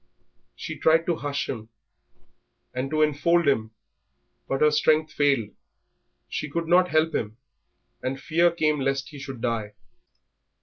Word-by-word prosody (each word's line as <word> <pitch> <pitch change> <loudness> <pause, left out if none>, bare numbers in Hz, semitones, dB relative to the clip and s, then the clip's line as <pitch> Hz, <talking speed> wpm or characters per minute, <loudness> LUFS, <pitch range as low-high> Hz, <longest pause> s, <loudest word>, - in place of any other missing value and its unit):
She - - -7
tried 165 +1 +4
to 170 -2 0
hush 145 -1 -3
him 110 -3 -6 1.0
and 130 +2 -3
to 155 +1 +2
enfold 155 +3 +2
him, 110 -6 +2 0.8
but 135 - -2
her 150 0 +5
strength 155 +1 +2
failed, 140 -7 +2 0.8
she 150 - -4
could 165 +3 -3
not 180 +1 +4
help 160 +1 +2
him, 110 +1 -3 0.6
and 135 +1 -3
fear 170 +4 +3
came 155 -3 0
lest 135 0 -1
he 145 - -10
should 135 -3 -8
die. 115 -3 -2
145 Hz, 140 wpm, -25 LUFS, 135-160 Hz, 1.0 s, her